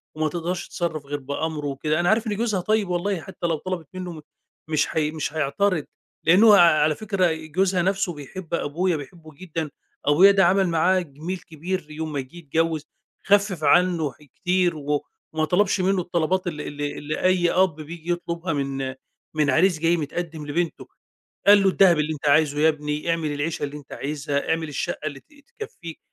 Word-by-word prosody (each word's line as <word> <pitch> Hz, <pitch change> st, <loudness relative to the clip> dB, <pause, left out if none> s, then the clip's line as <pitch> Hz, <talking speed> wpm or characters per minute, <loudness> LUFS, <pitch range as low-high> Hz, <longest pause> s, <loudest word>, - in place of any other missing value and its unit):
وما 155 Hz, 0 st, 0 dB
تقدرش 175 Hz, +2 st, -3 dB
تتصرّف 160 Hz, -4 st, -3 dB
غير 145 Hz, +1 st, -4 dB
بأمرُه 150 Hz, +2 st, -3 dB
وكده. 150 Hz, +3 st, -1 dB
أنا 175 Hz, 0 st, +2 dB
عارف 220 Hz, +2 st, +2 dB
إن 210 Hz, -, -1 dB
جوزها 215 Hz, -3 st, 0 dB
طيّب 215 Hz, 0 st, +1 dB
والله، 180 Hz, 0 st, -1 dB
حتّى 185 Hz, -2 st, -5 dB
لو 165 Hz, -, +1 dB
طَلَبِت 175 Hz, -2 st, -5 dB
منّه 180 Hz, -4 st, -6 dB, 0.5 s
مش 155 Hz, -2 st, +2 dB
هي 150 Hz, -1 st, +1 dB
مش 155 Hz, -1 st, -4 dB
هيعترض 160 Hz, +3 st, 0 dB, 0.4 s
لأن 180 Hz, +6 st, +6 dB
هو 220 Hz, -2 st, +8 dB
على 155 Hz, -5 st, +5 dB
فكرة 195 Hz, -5 st, +1 dB
جوزها 180 Hz, +4 st, 0 dB
نفْسُه 190 Hz, -1 st, 0 dB
بيحب 160 Hz, +4 st, -9 dB
أبويا، 170 Hz, +3 st, 0 dB
بيحبُه 155 Hz, +1 st, -11 dB
جدًا، 165 Hz, -2 st, -4 dB, 0.4 s
أبويا 175 Hz, +7 st, +7 dB
ده 195 Hz, -2 st, +4 dB
عمل 190 Hz, +2 st, +3 dB
معاه 180 Hz, +3 st, +3 dB
جِميل 165 Hz, +3 st, -5 dB
كبير 165 Hz, 0 st, -5 dB
يوم 155 Hz, 0 st, -5 dB
ما 140 Hz, -, -1 dB
جِه 130 Hz, +5 st, -8 dB
يتجوّز 160 Hz, -1 st, -1 dB, 0.4 s
خفِّف 200 Hz, -5 st, +2 dB
عنّه 170 Hz, 0 st, +3 dB
حاجات 145 Hz, +2 st, -21 dB
كتير، 180 Hz, -2 st, +1 dB
وما 150 Hz, +2 st, -3 dB
طلبش 195 Hz, +1 st, +3 dB
منّه 190 Hz, 0 st, +2 dB
الطلبات 175 Hz, +1 st, 0 dB
اللي 150 Hz, -3 st, -4 dB
اللي 145 Hz, 0 st, -4 dB
اللي 150 Hz, +1 st, -4 dB
أي 180 Hz, -2 st, +3 dB
أب 185 Hz, -4 st, +3 dB
بييجي 160 Hz, +2 st, -6 dB
يطلبها 170 Hz, 0 st, -2 dB
من 135 Hz, -2 st, -3 dB, 0.4 s
من 150 Hz, -2 st, +1 dB
عريس 160 Hz, +4 st, +3 dB
جاي 170 Hz, +1 st, +2 dB
متقدم 160 Hz, 0 st, -4 dB
لبنتُه، 170 Hz, +3 st, -2 dB, 0.6 s
قال 205 Hz, 0 st, +8 dB
له: 195 Hz, -, +5 dB
"الدهب 185 Hz, -4 st, +5 dB
اللي 150 Hz, +1 st, 0 dB
أنت 150 Hz, -1 st, -1 dB
عايزُه 145 Hz, 0 st, +3 dB
يا 160 Hz, +1 st, +5 dB
ابني، 150 Hz, +1 st, -3 dB
اعمل 160 Hz, -3 st, -1 dB
العيشة 150 Hz, +3 st, -2 dB
اللي 145 Hz, 0 st, -4 dB
أنت 145 Hz, -2 st, -15 dB
عايزها، 145 Hz, 0 st, -3 dB
اعمل 160 Hz, -1 st, 0 dB
الشقّة 150 Hz, +1 st, -3 dB
اللي 140 Hz, -2 st, -6 dB
ت -, -, -31 dB, 0.3 s
تكفّيك." 170 Hz, -, -8 dB
165 Hz, 180 wpm, -24 LUFS, 150-185 Hz, 0.6 s, هو